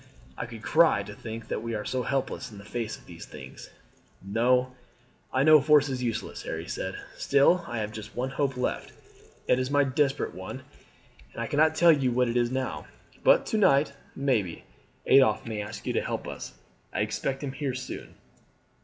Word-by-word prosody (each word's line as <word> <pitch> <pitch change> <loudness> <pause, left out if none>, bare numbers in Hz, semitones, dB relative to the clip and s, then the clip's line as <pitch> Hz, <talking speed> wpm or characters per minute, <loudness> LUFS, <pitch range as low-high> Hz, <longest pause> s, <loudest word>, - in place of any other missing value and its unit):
I 115 - -5
could 115 -2 -10
cry - - +4
to - - -9
think 115 0 -8
that - - -2
we 115 0 -3
are 105 0 -4
so 130 - -1
helpless 135 0 -2
in 105 - -11
the 100 - -11
face 115 -1 -4
of - - -20
these 85 -1 -10
things." 65 0 -11 0.5
"No; 125 +5 +2 0.6
I 130 - +2
know 155 0 +8
force 145 0 +5
is 130 -1 -3
useless," 115 -2 -3
Harry - - -5
said. - - -4 0.2
"Still 140 +6 +4
I 120 - -4
have 105 -1 -2
just 110 0 -9
one 130 +2 -2
hope 135 -2 -1
left. 125 - -2 0.6
It 125 - +4
is 130 0 -1
a 145 0 +4
desperate 135 +1 0
one, - - -7 0.7
and - - -5
I - - -2
cannot 155 +5 +3
tell 170 +1 +7
you 135 -5 +2
what 125 0 +2
it 120 - -2
is 120 -1 +2
now; 130 +1 -3 0.4
but - - +5
to 220 - 0
night, 140 -7 +4 0.2
maybe, 115 -11 0 0.4
Adolphe 130 -4 +5
may 110 -2 -3
ask 105 +2 -7
you - - -1
to - - +1
help - - -4
us. - - -7 0.4
I - - -1
expect 135 +1 -2
him 140 - -3
here 135 -1 -3
soon." 130 0 -7
130 Hz, 195 wpm, -27 LUFS, 115-140 Hz, 0.7 s, know